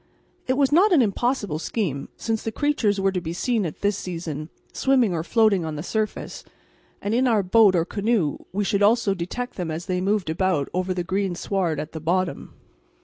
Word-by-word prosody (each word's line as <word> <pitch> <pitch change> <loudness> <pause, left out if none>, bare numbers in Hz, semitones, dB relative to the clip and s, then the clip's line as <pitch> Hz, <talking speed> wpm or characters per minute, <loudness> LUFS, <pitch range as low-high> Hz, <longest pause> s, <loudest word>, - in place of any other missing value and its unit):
It 260 - +2
was 275 0 +2
not 375 +7 +5
an 305 -8 +6
impossible 205 - -1
scheme, 160 - -3
since 225 -1 -2
the 225 - -3
creatures 220 -7 +1
were 195 0 +2
to 185 -1 -2
be 165 -1 -4
seen 220 +1 0
at 155 - -9
this 205 0 +1
season 165 -5 -5 0.2
swimming 255 -7 +2
or 160 -2 -2
floating 215 -2 +3
on 160 -1 -4
the 150 - -5
surface, 215 +2 -3 0.6
and 205 - -1
in 255 +2 +3
our 220 -4 +3
boat 200 0 +5
or 165 -1 +2
canoe 200 -6 0
we 205 +2 -1
should 200 0 0
also 205 -1 +4
detect 195 +8 -5
them 175 -3 -3
as 160 +2 -4
they 180 -2 -1
moved 195 -3 0
about 175 -4 0
over 185 +1 -1
the 180 - -1
green 190 0 -1
sward 175 -5 -1
at 155 - -5
the 160 - -6
bottom. 180 +3 -1
195 Hz, 205 wpm, -24 LUFS, 170-225 Hz, 0.6 s, an